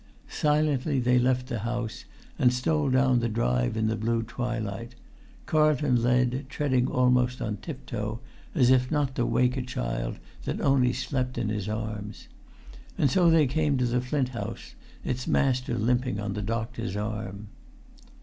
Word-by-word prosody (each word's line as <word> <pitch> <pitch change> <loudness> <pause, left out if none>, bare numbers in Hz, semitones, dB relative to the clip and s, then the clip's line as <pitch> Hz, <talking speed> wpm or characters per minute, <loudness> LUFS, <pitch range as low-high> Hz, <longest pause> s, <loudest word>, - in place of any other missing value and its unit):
Silently 150 -2 +1
they 125 0 +3
left 125 0 +1
the 120 -4 -3
house, 115 0 -4 0.3
and 125 - +5
stole 140 +3 +1
down 130 -1 +3
the 120 0 0
drive 60 - 0
in 110 - +1
the 110 0 +1
blue 115 +1 0
twilight. 115 -1 -4 0.5
Carlton 150 -5 +3
led, 125 +2 +1
treading 130 -3 +1
almost 125 0 +2
on 105 -2 -2
tip 140 -5 -8
toe, 105 -1 -4 0.4
as 130 -5 +5
if 125 -1 +3
not 145 -3 0
to 120 -2 0
wake 125 0 +2
a - - 0
child - - -3 0.3
that - - -2
only 130 -3 +3
slept 125 0 -2
in 115 -3 -1
his 105 -1 -2
arms. 105 -1 -5 0.7
And 140 - +2
so 180 -3 +4
they 165 -2 +5
came 145 +1 +1
to 125 - +1
the 120 +1 +1
Flint 130 0 -1
House, 125 - -6 0.3
its 125 0 -2
master 125 -3 +1
limping 125 0 0
on 105 -1 -3
the 105 - -3
doctor's 115 -1 -3
arm. 105 -1 -5
125 Hz, 160 wpm, -27 LUFS, 110-130 Hz, 0.7 s, and